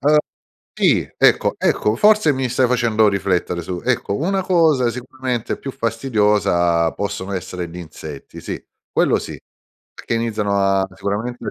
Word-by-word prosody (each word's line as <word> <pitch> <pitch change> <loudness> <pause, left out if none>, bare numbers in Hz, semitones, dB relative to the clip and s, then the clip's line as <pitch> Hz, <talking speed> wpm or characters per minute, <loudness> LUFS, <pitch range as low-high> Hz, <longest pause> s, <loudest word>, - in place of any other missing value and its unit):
uhm, 150 +2 +4 0.6
sì, - - +2
ecco, - - +3
ecco, 105 - +1
forse 210 - +5
mi 130 -2 -1
stai 125 +1 +2
facendo 115 -3 +3
riflettere 95 -3 0
su 90 +1 -5
ecco, 100 - 0
una 190 +5 0
cosa 160 -9 +3
sicuramente 125 -1 -4
più 135 - -5
fastidiosa 105 -8 +1
possono 100 -1 -4
essere 90 -2 -4
gli 85 - -10
insetti, 80 -4 -9
sì, - - -5 0.3
quello - - +2
sì, - - -7 0.6
perché - - -4
iniziano 110 -3 -1
a 95 -1 +2
sicuramente 105 +6 -3
105 Hz, 140 wpm, -20 LUFS, 95-130 Hz, 0.6 s, forse